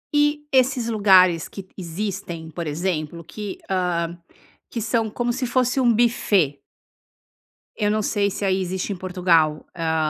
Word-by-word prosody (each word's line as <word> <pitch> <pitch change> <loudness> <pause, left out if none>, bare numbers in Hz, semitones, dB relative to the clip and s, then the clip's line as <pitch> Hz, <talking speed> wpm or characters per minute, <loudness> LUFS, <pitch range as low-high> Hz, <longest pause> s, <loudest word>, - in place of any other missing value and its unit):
E 295 0 +3
esses 255 -2 +2
lugares 185 -6 +5
que 195 -2 -9
existem, 175 -2 -5
por 170 +1 -5
exemplo, 165 0 -2
que 200 +4 -7
hã, 175 -3 -1 0.5
que 235 - -4
são 225 0 0
como 240 +3 -1
se 255 +1 -2
fosse 250 +2 +1
um 245 -2 +4
buffet 205 - +2 1.2
eu 205 -1 +1
não 215 0 +1
sei, 205 -1 +1
se 200 - -3
aí 190 0 +2
existe 185 +2 -2
em - - -6
Portugal, 175 -4 +1
hã, 165 -1 -1
190 Hz, 150 wpm, -23 LUFS, 170-225 Hz, 1.2 s, lugares